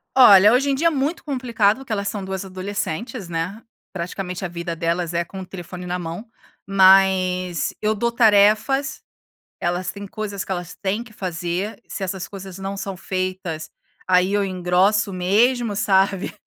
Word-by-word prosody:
Olha, 210 -6 +8
hoje 275 +3 +2
em - - +1
dia 320 +5 +2
é - - +6
muito 300 +3 -2
complicado, 240 -7 +1
porque 270 -3 -10
elas 200 -2 -1
são 205 -2 -3
2 190 0 -4
adolescentes, 195 +2 -4
né, 170 +6 -3 0.3
praticamente 180 +1 -5
a - - -1
vida 170 0 -5
delas 170 +1 -1
é 170 0 +1
com 190 +3 -10
o - - -7
telefone 180 0 -8
na 180 0 -3
mão, 170 +5 -6 0.4
mas, 190 -2 +4
eu 215 0 +2
dou 235 +3 0
tarefas, 225 +5 +3 0.6
elas 175 +1 -1
têm 200 0 -8
coisas 200 -1 -5
que - - -8
elas 180 -1 -4
têm 205 +4 -1
que 235 - -16
fazer, 185 +3 -4
se 200 - -5
essas 190 -1 -4
coisas 195 -2 -9
não 195 +1 -4
são 195 -1 -5
feitas, 185 -4 -4 0.4
aí 185 +1 +3
eu 205 0 +2
engrosso 190 +2 +1
mesmo, 215 +5 +2
sabe? 195 -2 +1
195 Hz, 170 wpm, -22 LUFS, 180-210 Hz, 0.6 s, Olha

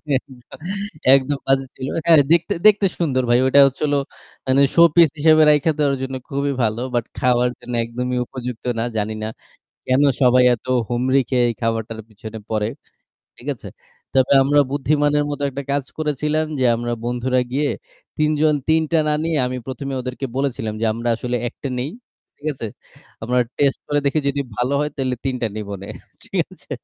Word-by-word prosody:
একদ 130 0 -5 0.8
একদম 135 +1 0
বাজে 135 0 +2
ছিল। 130 - -5 0.2
হ্যাঁ, 165 -2 +7
দেখতে 170 0 +3
দেখতে 205 -1 +5
সুন্দর 135 -7 +1
ভাই। 120 +1 +5
ওইটা 130 +2 +5
হচ্ছিল 145 +2 -2 0.5
মানে 130 +1 +4
showpiece 170 -2 +6
হিসেবে 155 +1 +6
রাইখা 150 +2 +4
দেওয়ার 140 -2 +2
জন্য 130 0 -4
খুবই 140 0 -1
ভালো। 110 +2 -1
But 120 - 0
খাওয়ার 125 0 +2
জন্য 125 - -8
একদমই 125 +2 -3
উপযুক্ত 125 -2 -7
না। - - 0
জানিনা 110 +1 -2 0.6
কেন 130 +2 +3 0.2
সবাই 125 0 +5
এত 115 - -24 0.2
হুমড়ি 130 +3 +2
খেয়ে 125 -2 +3
এই 115 - -3
খাবারটার 115 -1 -2
পিছনে 110 +1 -9
পড়ে। 105 -1 0 0.7
ঠিক - - -11
আছে? - - -11 0.5
তবে 130 0 +3
আমরা 145 +2 +4
বুদ্ধিমানের 145 +1 +1
মত 145 -1 -4
একটা 140 +1 -5
কাজ 140 -1 0
করেছিলাম 150 +1 0
যে - - +2
আমরা 120 +1 -3
বন্ধুরা 125 +1 0
গিয়ে 145 +2 +1 0.5
৩ 155 0 +2
জন 155 -1 +4
৩ 160 0 +4
টা 165 - +4
না - - +2
নিয়ে 165 -2 0
আমি 125 0 -3
১ম 130 +1 -6
এই 130 - -2
ওদেরকে 125 +2 -4
বলেছিলাম 125 -6 -2
যে - - 0
আমরা 115 +1 -3
আসলে 125 +1 -2
একটা 140 - -7
নেই। 135 +4 -3 0.5
ঠিক 145 - -11
আছে? 120 - -5 0.6
আমরা 125 +3 0 0.2
test 140 -2 +2
করে 145 - +1
দেখি 140 +3 +2
যদি 140 0 -1 0.2
ভালো 125 +3 0
হয় 150 0 -1
তাইলে 130 -2 -1
৩ 135 -1 0
টা - - +2
নিবনে। 100 -2 -6 0.4
ঠিক - - -7 0.2
আছে? - - -19
130 Hz, 175 wpm, -20 LUFS, 120-145 Hz, 0.8 s, হ্যাঁ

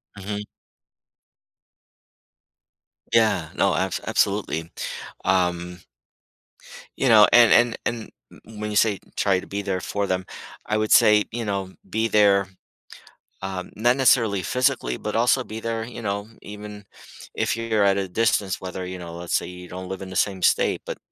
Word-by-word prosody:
Mhm. 105 +1 -5 2.7
Yeah, 110 -8 +3
no, - - +2
abs - - -1
absolutely, 85 -5 0 0.5
um 90 -1 0 1.2
you 135 - +1
know, 105 -2 +8
and 120 -1 +7
and 120 -1 +4 0.6
and 110 -1 -14
when 105 0 -3
you - - -4
say 105 -2 +3 0.2
try 95 -2 +2
to - - -10
be 100 +1 -4
there 95 -2 -2
for 100 -1 -2
them, 95 0 -1 0.4
I 105 - 0
would 110 0 -1
say, 105 -1 +6
you 115 0 -4
know, 95 -2 -3
be 110 +1 0
there, 100 -3 +4 0.9
um, 95 -1 -5
not 120 +4 +2
necessarily 115 -7 +3
physically, 90 - 0
but - - -3
also - - +3
be 110 +1 -7
there, 115 0 -3
you 115 0 -8
know, 100 0 -3
even 105 0 -9 0.5
if - - 0
you're 110 -2 0
at 100 0 +3
a 95 -1 -1
distance, 100 -1 0
whether, 95 0 -5
you 90 0 -6
know, 85 -1 -8
let's 85 0 -5
say, - - 0
you 90 0 -10
don't 90 +1 -8
live 95 0 -5
in 95 - -7
the 95 - -8
same 95 -2 0
state, - - +2
but - - -5
100 Hz, 160 wpm, -23 LUFS, 95-110 Hz, 2.7 s, know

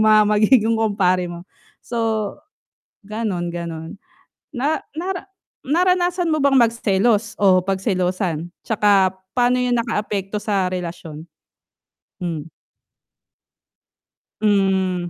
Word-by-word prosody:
mga 215 0 +6
magiging 215 +2 +4
kumpare 195 -5 +1
mo. 175 0 -8 0.4
So 225 -3 -1 0.7
gano'n, 200 -6 -3
gano'n. 165 -2 -6 0.6
Na 290 +3 -1
nara 360 +3 -4 0.4
naranasan 355 +3 +1
mo 310 -3 +1
bang 275 -1 +5
magselos 225 -2 +1
o 185 -2 +4
pagselosan, 185 -3 -1 0.2
'tsaka 200 -4 +3 0.2
paano 250 0 +2
'yon 245 -1 +1
nakaapekto 210 -3 -3
sa 195 -3 +1
relasyon? 170 -4 -6 1.0
Hmm. 165 -3 -5 1.9
Hmm, 190 -4 +1
205 Hz, 90 wpm, -21 LUFS, 185-235 Hz, 1.9 s, mga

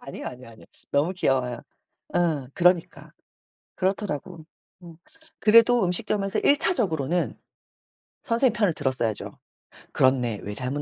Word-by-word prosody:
아니요, 135 - -8
아니요, 125 -1 -9
아니요. 115 - -16 0.2
너무 155 +6 +1
귀여워요. 130 -8 0 0.6
어 160 -6 0
그러니까. 180 -1 +1 0.6
그렇더라고. 185 -4 -3 0.4
음 170 -2 -12 0.4
그래도 230 +1 +5
음식점에서 195 +2 -1
1 285 - +4
차적으로는 175 - 0 0.8
선생님 240 -1 +2
편을 205 -6 +1
들었어야죠. 125 -7 -2 0.6
"그렇네. 125 -5 +2
왜 105 - -5
잘못 130 +5 -3
170 Hz, 305 characters per minute, -25 LUFS, 130-195 Hz, 0.8 s, 그래도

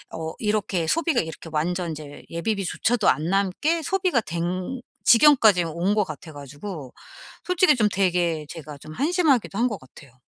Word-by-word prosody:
어 160 0 -5
이렇게 210 -5 -1
소비가 325 - +2
이렇게 160 0 -8
완전 175 +3 -1
인제 150 -2 -9
예비비조차도 205 +5 0
안 155 - +1
남게 200 - +1
소비가 365 - +1
된 180 +8 -4 0.2
지경까지 230 -8 +6
온 170 +6 -1
것 210 - +3
같아 160 +2 -9
가지고 145 +1 -8 0.5
솔직히 360 -4 +4
좀 215 -4 +2
되게 175 -5 0
제가 150 -3 -9
좀 155 - -11
한심하기도 285 - +1
한 245 +2 +3
것 210 -7 -4
같아요. 130 0 -17
185 Hz, 335 characters per minute, -24 LUFS, 160-240 Hz, 0.5 s, 지경까지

